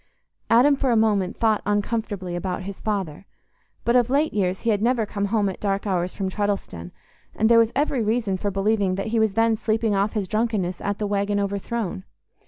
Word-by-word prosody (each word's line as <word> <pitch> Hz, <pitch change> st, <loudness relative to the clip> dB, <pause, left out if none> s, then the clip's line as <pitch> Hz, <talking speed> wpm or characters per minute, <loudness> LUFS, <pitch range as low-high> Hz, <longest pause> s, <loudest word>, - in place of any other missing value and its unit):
Adam 255 Hz, +5 st, +5 dB
for 270 Hz, -1 st, -1 dB
a 235 Hz, -, +3 dB
moment 205 Hz, -4 st, +1 dB
thought 220 Hz, -2 st, +2 dB
uncomfortably 205 Hz, -3 st, -2 dB
about 180 Hz, +1 st, -3 dB
his 195 Hz, 0 st, -7 dB
father; 195 Hz, -5 st, -3 dB, 0.6 s
but 235 Hz, -, +2 dB
of 245 Hz, -1 st, +3 dB
late 290 Hz, +4 st, +1 dB
years 190 Hz, -2 st, 0 dB
he 230 Hz, -, +1 dB
had 205 Hz, -1 st, 0 dB
never 235 Hz, -1 st, +2 dB
come 200 Hz, -1 st, -3 dB
home 205 Hz, 0 st, +1 dB
at 190 Hz, -, -4 dB
dark 200 Hz, 0 st, -1 dB
hours 180 Hz, -2 st, -1 dB
from 195 Hz, -, -3 dB
Treddleston, 195 Hz, -, -3 dB, 0.5 s
and 220 Hz, +1 st, +2 dB
there 230 Hz, -1 st, +7 dB
was 230 Hz, 0 st, +3 dB
every 280 Hz, -2 st, +1 dB
reason 215 Hz, -2 st, 0 dB
for 205 Hz, +2 st, -2 dB
believing 195 Hz, -1 st, +1 dB
that 195 Hz, +3 st, -3 dB
he 230 Hz, -, +3 dB
was 220 Hz, -2 st, +2 dB
then 225 Hz, +1 st, +3 dB
sleeping 220 Hz, 0 st, 0 dB
off 200 Hz, +1 st, +1 dB
his 205 Hz, -4 st, -2 dB
drunkenness 210 Hz, -4 st, -1 dB
at 205 Hz, 0 st, -2 dB
the 210 Hz, -, -2 dB
"Waggon 205 Hz, 0 st, 0 dB
Overthrown." 200 Hz, 0 st, -3 dB
205 Hz, 200 wpm, -23 LUFS, 195-225 Hz, 0.6 s, there